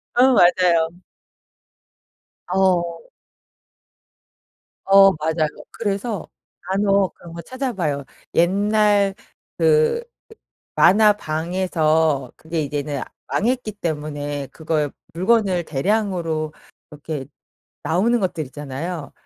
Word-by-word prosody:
어 255 +2 +5
맞아요. 175 -4 +4 1.6
어. 185 - 0 1.8
어 195 0 +7
맞아요. 155 -1 -1 0.2
그래서 205 -1 -3 0.3
간혹 195 0 +1
그런 170 -1 -13
거 170 - -7
찾아봐요. 185 - -3 0.3
옛날 200 +2 +3 0.4
그 470 0 +3 0.7
만화방에서 160 - +2
그게 160 0 -4
이제는 145 -1 -3 0.3
망했기 245 0 -1
때문에 145 -6 -4
그걸 155 -2 -1 0.2
물건을 185 -1 +2
대량으로 165 -1 -1 0.4
이렇게 150 -2 -6 0.6
나오는 215 +9 +2
것들 180 -5 -2
있잖아요. 145 +4 -6
175 Hz, 190 characters per minute, -21 LUFS, 155-205 Hz, 1.8 s, 어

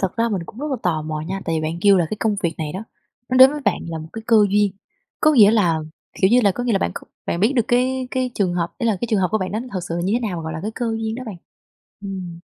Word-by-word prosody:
thật 190 +1 -2
ra 230 +1 +2
mình 195 -5 -2
cũng 225 - -12
rất 300 - -3
là 265 - 0
tò 160 -4 0
mò 155 0 -4
nha, 190 +5 -4
tại 165 - -1
vì - - -1
bạn 160 +2 -3
kêu 200 -1 +6
là 170 -3 +2
cái 215 - -2
công 215 -2 +1
việc 170 -2 0
này 155 -1 -3
đó, 200 +4 -6 0.4
nó 255 - 0
đến 260 +1 +9
với 295 0 -5
bạn - - +1
là 165 -1 -4
một 155 +1 -9
cái 225 - -7
cơ 230 -2 +5
duyên, 205 -1 +2 0.5
có 310 - +5
nghĩa 215 -7 +7
là, 180 -8 +2 0.4
kiểu 190 +2 +4
như 250 +1 +6
là, 200 -4 +3
có 245 - -4
nghĩa 240 - +1
là 195 - +3
bạn 85 - -1
c - - -14 0.3
bạn 170 - -1
biết 225 +7 +3
được 235 - +3
cái 255 +1 +1
cái 255 -1 -1
trường 185 -4 0
hợp, 170 -1 -2
ý 235 - -1
là 215 -4 +2
cái 240 - -1
trường 210 -3 +2
hợp 180 - +2
của 215 - +1
bạn 185 -1 -3
đó 215 - -1
nó 255 - -8
thật 185 - -2
sự 165 - -3
là - - -2
như 195 - 0
thế 240 - +1
nào 180 - -4
mà 165 - -5
gọi 160 0 -5
là 160 - -4
cái 215 - -2
cơ 240 - -2
duyên 220 0 -3
đó 255 - -6
bạn? 200 -5 -6 0.7
Ừm. 185 -4 -6
200 Hz, 335 wpm, -21 LUFS, 175-235 Hz, 0.7 s, đến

